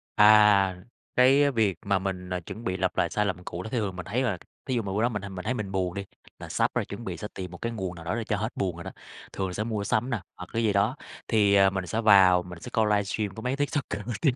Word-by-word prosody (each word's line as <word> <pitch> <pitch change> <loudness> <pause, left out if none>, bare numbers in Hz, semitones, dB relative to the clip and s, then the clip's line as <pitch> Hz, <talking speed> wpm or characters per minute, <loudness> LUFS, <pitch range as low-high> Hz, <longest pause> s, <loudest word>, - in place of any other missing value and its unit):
À, 105 -3 +6 0.4
cái 140 +3 +5
việc 105 -8 +1
mà 100 -1 +2
mình, 90 -1 -4
ờ, 90 0 -2
chuẩn 110 +6 -9
bị 95 -3 -2
lặp 95 0 -1
lại 85 - +2
sai 105 0 0
lầm 90 -2 -3
cũ 90 +1 -6
thì 110 - -6
thường 100 -4 -2
mình 90 - -6
thấy 120 +7 -1
là, 105 -8 0 0.3
thí 130 -3 -1
dụ 115 - +1
mà 100 -2 -5
bữa 105 - 0
đó 120 - +3
mình, 105 -3 -4
à, - - -6
mình 90 -1 -7
thấy 125 - 0
mình 105 -5 -4
buồn 90 -2 -1
đi, 100 0 -5 0.3
là - - -8
sắp - - +1
rồi, - - 0
chuẩn - - -8
bị - - -4
sẽ - - -5
tìm 90 -2 -6
một 85 - -9
cái 115 +5 -3
nguồn 95 -5 -4
nào 85 -1 -11
đó 90 - -1
để 115 - -2
cho 105 -1 -1
hết 110 +3 -2
buồn 90 -3 -1
rồi 85 - -8
đó, - - -7 0.4
thường 95 -1 -2
là 90 - -6
sẽ 105 - -2
mua 110 -3 -2
sắm 110 +5 0
nè, 115 -7 -2
hoặc 90 - -9
cái 115 0 0
gì 105 -2 +2
đó. 105 +7 +2 0.3
Thì, 105 -3 +4
ờ, 95 -1 +6
mình 95 -2 -4
sẽ 115 +5 -1
vào 95 -4 +6
mình 90 -1 -10
sẽ - - -8
coi 110 -1 +3
livestream 105 0 0
có 110 - -7
mấy 125 +3 -1
TikToker 145 -7 -2
nổi 120 -2 -3
tiếng 140 -6 +3
100 Hz, 300 wpm, -27 LUFS, 95-110 Hz, 0.4 s, À